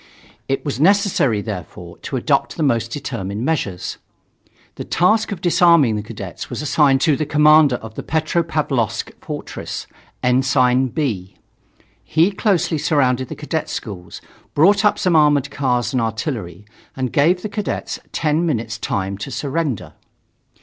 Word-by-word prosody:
It 135 - -2
was 140 -2 -3
necessary, 175 - +3
therefore, 90 -4 -7
to - - -5
adopt - - 0
the 160 - 0
most 115 -5 +1
determined 115 -5 -4
measures. 100 - -2 0.7
The - - -6
task 215 +5 +2
of 190 -4 -5
disarming 170 -9 +4
the 105 - -2
cadets 105 - -8
was - - -4
assigned 140 -2 +3
to 155 -2 +3
the 155 - -1
commandant 150 -4 +5
of 110 -1 -8
Petropavlovsk 155 - -1
fortress, - - -6 0.4
Ensign 130 0 +3
B. 115 - -3 0.7
He 165 +5 +2
closely 190 -5 +1
surrounded 130 -4 +1
the - - -7
cadet 155 +1 -3
schools, 90 -7 -7 0.3
brought 195 +8 +5
up 210 - +3
some 180 -3 +1
armored 145 -2 +3
cars 125 -4 0
and 125 - +1
artillery, 110 - -4 0.3
and 130 -2 -3
gave 175 +5 +3
the - - -1
cadets 205 0 -4
ten 155 +1 0
minutes' 115 -8 -2
time 100 -1 -2
to 100 - -5
surrender. 145 - -3
140 Hz, 140 wpm, -20 LUFS, 115-160 Hz, 0.7 s, commandant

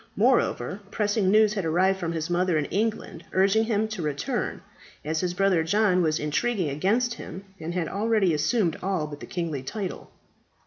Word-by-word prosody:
Moreover, 125 +11 +2
pressing 205 -2 +1
news 215 +1 +5
had 195 -3 -2
arrived 185 +4 +2
from 170 -2 -2
his 160 -1 -2
mother 175 -1 +1
in 150 - 0
England, 210 -3 -2
urging 200 +4 +3
him 220 -1 +1
to 215 -5 -4
return, 150 -2 -2 0.4
as 160 +1 -1
his 180 0 -2
brother 195 -3 +3
John 195 +1 +3
was 155 -2 +1
intriguing 165 +3 0
against 220 - +1
him, 190 -4 -8 0.2
and 170 +2 -5
had 175 -3 -1
already 210 -2 +1
assumed 170 - +1
all 185 -5 -1
but 145 -1 -8
the - - -9
kingly 165 -6 -3
tide. 190 +7 -4
185 Hz, 175 wpm, -26 LUFS, 160-210 Hz, 0.4 s, news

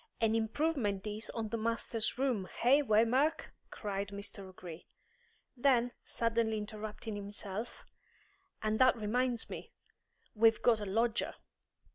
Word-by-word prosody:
"An 225 -1 +3
improvement 225 -3 0
this 210 +1 -3
on 225 -2 -3
the 230 +1 -2
masters' 230 0 0
room, 250 -8 0
eh, 270 +5 +6
Waymark?" 245 +5 +2 0.2
cried 200 -1 -3
Mr. 200 +1 -6
O'Gree. 175 -3 -10 0.7
Then, 245 -2 +3
suddenly 230 -1 0
interrupting 215 0 -5
himself, 205 +2 -5 0.8
"And 215 0 +1
that 255 -1 +6
reminds 235 +2 0
me! - - -8 0.6
We've 225 0 +4
got 230 -3 +5
a 205 - -4
lodger." 225 +4 +1
225 Hz, 120 wpm, -33 LUFS, 210-240 Hz, 0.8 s, eh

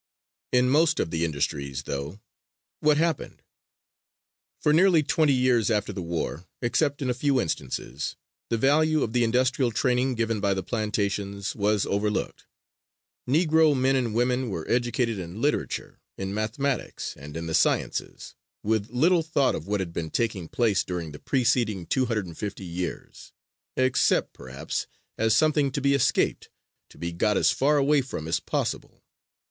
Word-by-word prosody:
In 125 0 +4
most 155 +4 +3
of 80 - -1
the 80 0 -1
industries, 70 -3 -2
though, 70 +7 -5 0.6
what 150 -1 +3
happened? 165 -2 -1 1.2
For 150 - +2
nearly 170 -1 +5
twenty 155 0 +2
years 125 -4 +2
after 105 -2 0
the 95 - -5
war, 85 0 -4
except 135 +4 0
in 130 - -1
a - - +1
few 135 +1 +1
instances, 70 - -3 0.3
the 115 - +1
value 155 +4 +3
of 110 - -3
the 120 -1 +3
industrial 130 +2 +2
training 125 +2 +1
given 115 -2 -1
by 100 -1 +1
the 95 - -3
plantations 100 -2 -2
was 105 -1 +1
overlooked. 105 +1 -2 0.8
Negro 155 0 +4
men 135 +1 +3
and 120 -4 0
women 125 +1 +1
were 85 -6 -5
educated 120 -2 0
in 90 +3 -7
literature, 145 +4 -2 0.2
in 95 0 -4
mathematics 115 +5 -2
and 75 +3 -9
in 85 - -4
the 80 - -4
sciences, - - 0 0.3
with 110 0 0
little 165 +8 +3
thought 155 -4 +1
of 80 - -5
what 105 -1 0
had 85 -3 -5
been 80 -2 -3
taking 105 -6 -1
place 110 -3 +1
during 85 -3 -4
the 75 - -10
preceding 120 -7 +1
two 130 +5 +1
hundred 110 -4 -1
and 85 -3 -11
fifty 100 -2 -5
years, 90 0 -6 0.4
except, 130 0 +2
perhaps, 65 +2 -5 0.3
as 110 0 +3
something 150 0 +3
to 135 - -2
be 140 0 +2
escaped, 140 - +1 0.4
to - - -18
be 85 0 -4
got 100 +5 +1
as - - +4
far 145 +3 +2
away 145 +1 +3
from 125 -12 -6
as 80 - +1
possible. - - -3
115 Hz, 160 wpm, -26 LUFS, 95-135 Hz, 1.2 s, nearly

